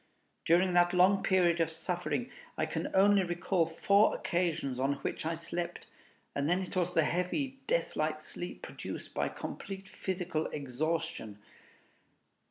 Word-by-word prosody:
During 180 Hz, +2 st, +4 dB
that 175 Hz, 0 st, +4 dB
long 190 Hz, +2 st, +5 dB
period 175 Hz, -2 st, +3 dB
of 165 Hz, -, +2 dB
suffering, 180 Hz, +8 st, -2 dB, 0.3 s
I -, -, +1 dB
can -, -, -3 dB
only 200 Hz, +1 st, +6 dB
recall 175 Hz, -1 st, +1 dB
four 200 Hz, +6 st, +4 dB
occasions 165 Hz, -7 st, -1 dB
on 135 Hz, +2 st, +2 dB
which -, -, -2 dB
I 165 Hz, -, 0 dB
slept, 170 Hz, +1 st, -4 dB, 0.5 s
and 140 Hz, +2 st, 0 dB
then 180 Hz, +2 st, +2 dB
it 185 Hz, -, -7 dB
was 180 Hz, -1 st, 0 dB
the 165 Hz, -, +5 dB
heavy, 220 Hz, -, -1 dB
death -, -, 0 dB
like 155 Hz, 0 st, 0 dB
sleep 175 Hz, +3 st, -6 dB
produced -, -, -7 dB
by -, -, 0 dB
complete 195 Hz, 0 st, -7 dB
physical 180 Hz, -4 st, -2 dB
exhaustion. 140 Hz, -6 st, -3 dB
175 Hz, 145 wpm, -32 LUFS, 160-190 Hz, 0.5 s, only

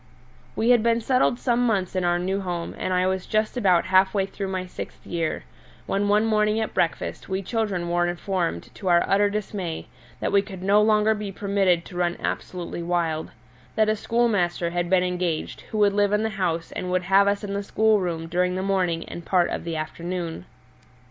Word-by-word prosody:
We 230 Hz, +2 st, +3 dB
had 240 Hz, -2 st, +5 dB
been 230 Hz, +1 st, +2 dB
settled 250 Hz, 0 st, +2 dB
some 245 Hz, -1 st, +1 dB
months 195 Hz, -6 st, 0 dB
in 185 Hz, -, 0 dB
our 175 Hz, 0 st, +2 dB
new 190 Hz, +3 st, -1 dB
home, 175 Hz, -3 st, -4 dB
and -, -, -2 dB
I 180 Hz, 0 st, +2 dB
was 190 Hz, 0 st, -1 dB
just 215 Hz, +2 st, 0 dB
about 185 Hz, -8 st, +3 dB
half 190 Hz, +2 st, +3 dB
way 195 Hz, -1 st, +2 dB
through 195 Hz, 0 st, -5 dB
my 185 Hz, -1 st, -3 dB
sixth 180 Hz, -, -9 dB
year, 165 Hz, -2 st, -2 dB, 0.4 s
when 200 Hz, +1 st, 0 dB
one 210 Hz, +2 st, +3 dB
morning 215 Hz, 0 st, +2 dB
at 220 Hz, -, -2 dB
breakfast 170 Hz, -, -1 dB
we 190 Hz, +1 st, -2 dB
children 200 Hz, -4 st, -1 dB
were 175 Hz, 0 st, +1 dB
informed 175 Hz, -, -2 dB
to 190 Hz, -, -7 dB
our 175 Hz, -1 st, +5 dB
utter 205 Hz, +1 st, +3 dB
dismay 200 Hz, -5 st, -4 dB, 0.3 s
that -, -, -1 dB
we 200 Hz, 0 st, +5 dB
could 190 Hz, -2 st, -9 dB
no 200 Hz, +2 st, +4 dB
longer 215 Hz, 0 st, +4 dB
be 210 Hz, -2 st, -5 dB
permitted 195 Hz, -3 st, +1 dB
to 175 Hz, -, -9 dB
run 175 Hz, -1 st, 0 dB
absolutely 175 Hz, -1 st, -4 dB
wild; 170 Hz, -2 st, -1 dB, 0.5 s
that 215 Hz, 0 st, +3 dB
a 215 Hz, -, +2 dB
schoolmaster 205 Hz, -7 st, 0 dB
had 175 Hz, 0 st, -1 dB
been 185 Hz, -1 st, +4 dB
engaged 180 Hz, -3 st, -2 dB
who 215 Hz, -, -4 dB
would 205 Hz, -1 st, +4 dB
live 205 Hz, 0 st, +2 dB
in 210 Hz, +1 st, +2 dB
the 220 Hz, -, 0 dB
house 170 Hz, -5 st, -2 dB
and 180 Hz, -, -4 dB
would 180 Hz, 0 st, 0 dB
have 195 Hz, +2 st, +4 dB
us 200 Hz, +1 st, 0 dB
in 200 Hz, -1 st, -4 dB
the 200 Hz, -, -1 dB
schoolroom 195 Hz, -6 st, +1 dB
during 180 Hz, +2 st, 0 dB
the 185 Hz, -, -2 dB
morning 180 Hz, -4 st, 0 dB
and 170 Hz, -, -7 dB
part 180 Hz, 0 st, +2 dB
of -, -, -4 dB
the 165 Hz, -1 st, -3 dB
afternoon. 170 Hz, +2 st, -4 dB
190 Hz, 205 wpm, -24 LUFS, 175-210 Hz, 0.5 s, had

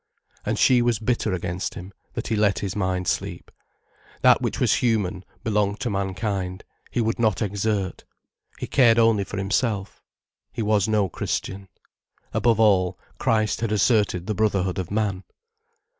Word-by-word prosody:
And -, -, -1 dB
she 125 Hz, -2 st, +5 dB
was 120 Hz, -2 st, +2 dB
bitter 110 Hz, 0 st, -1 dB
against 90 Hz, 0 st, -3 dB
him, 95 Hz, +3 st, -9 dB, 0.2 s
that -, -, -4 dB
he 115 Hz, -, +1 dB
let 105 Hz, -2 st, +2 dB
his 100 Hz, -3 st, -3 dB
mind 95 Hz, -3 st, -1 dB
sleep. -, -, -3 dB, 0.7 s
That -, -, +6 dB
which -, -, -2 dB
was -, -, +3 dB
human, 100 Hz, -6 st, 0 dB, 0.2 s
belonged 105 Hz, -2 st, 0 dB
to 120 Hz, -, -1 dB
mankind, 95 Hz, -1 st, -2 dB, 0.3 s
he -, -, -2 dB
would 115 Hz, 0 st, 0 dB
not 110 Hz, -6 st, +2 dB
exert. 100 Hz, -1 st, -2 dB, 0.5 s
He -, -, -4 dB
cared 120 Hz, -4 st, +4 dB
only 115 Hz, -3 st, +4 dB
for 95 Hz, -, -7 dB
himself. 100 Hz, +1 st, -1 dB, 0.5 s
He 115 Hz, -, -3 dB
was 105 Hz, -2 st, +2 dB
no 105 Hz, -3 st, +2 dB
Christian. 95 Hz, +3 st, -4 dB, 0.7 s
Above 115 Hz, -2 st, +2 dB
all, 95 Hz, -4 st, +3 dB, 0.2 s
Christ 110 Hz, -1 st, +1 dB
had 115 Hz, -2 st, -1 dB
asserted 105 Hz, -4 st, +2 dB
the 110 Hz, -, -1 dB
brotherhood 95 Hz, -3 st, 0 dB
of 90 Hz, -, -4 dB
man. 100 Hz, -2 st, -1 dB
105 Hz, 155 wpm, -24 LUFS, 95-110 Hz, 0.7 s, That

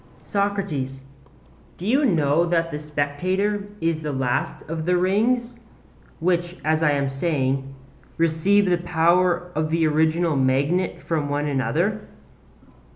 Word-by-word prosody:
SOCRATES: 195 Hz, -10 st, -2 dB, 0.8 s
Do 180 Hz, -, -7 dB
you 270 Hz, +7 st, +3 dB
know 155 Hz, -, +2 dB
that 165 Hz, -1 st, 0 dB
the 150 Hz, -, -4 dB
spectator 180 Hz, +8 st, -1 dB
is 165 Hz, -1 st, 0 dB
the 150 Hz, -1 st, -3 dB
last 130 Hz, -3 st, -2 dB
of 160 Hz, +1 st, -4 dB
the 180 Hz, 0 st, +3 dB
rings 230 Hz, +6 st, +1 dB, 0.6 s
which, 175 Hz, +1 st, 0 dB
as 155 Hz, +1 st, +2 dB
I 160 Hz, -, +4 dB
am 140 Hz, -1 st, 0 dB
saying, 135 Hz, -2 st, -1 dB, 0.4 s
receive 165 Hz, +5 st, +3 dB
the 175 Hz, -1 st, +3 dB
power 175 Hz, +1 st, +2 dB
of 155 Hz, 0 st, -1 dB
the 165 Hz, 0 st, +2 dB
original 160 Hz, +1 st, +2 dB
magnet 140 Hz, +7 st, +1 dB
from 155 Hz, -4 st, -1 dB
one 145 Hz, +1 st, -1 dB
another? 160 Hz, +9 st, 0 dB
165 Hz, 130 wpm, -23 LUFS, 145-185 Hz, 0.8 s, I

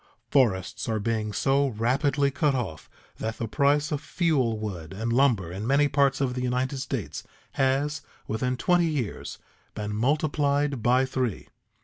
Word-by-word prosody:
Forests 120 Hz, -2 st, +1 dB
are 110 Hz, -1 st, 0 dB
being 110 Hz, 0 st, -1 dB
so 140 Hz, +5 st, +2 dB
rapidly 135 Hz, +5 st, +1 dB
cut 140 Hz, 0 st, +1 dB
off 95 Hz, -12 st, -4 dB, 0.3 s
that 110 Hz, 0 st, -4 dB
the 115 Hz, -, -3 dB
price 145 Hz, +6 st, +2 dB
of 150 Hz, -1 st, -1 dB
fuel 150 Hz, -8 st, +1 dB
wood 95 Hz, -6 st, -6 dB
and 115 Hz, +4 st, -2 dB
lumber 120 Hz, -10 st, +2 dB
in 100 Hz, +5 st, -4 dB
many 140 Hz, +2 st, +4 dB
parts 140 Hz, -1 st, +2 dB
of 135 Hz, -3 st, 0 dB
the 125 Hz, -, -3 dB
United 125 Hz, +2 st, -1 dB
States 135 Hz, -, -4 dB, 0.3 s
has, 140 Hz, +2 st, 0 dB, 0.3 s
within 125 Hz, +3 st, -1 dB
twenty 175 Hz, +2 st, +3 dB
years, 140 Hz, -9 st, -3 dB, 0.4 s
been 105 Hz, -1 st, -4 dB
multiplied 145 Hz, +1 st, +1 dB
by 125 Hz, +3 st, +3 dB
three. 130 Hz, -5 st, -3 dB
130 Hz, 150 wpm, -26 LUFS, 110-140 Hz, 0.4 s, many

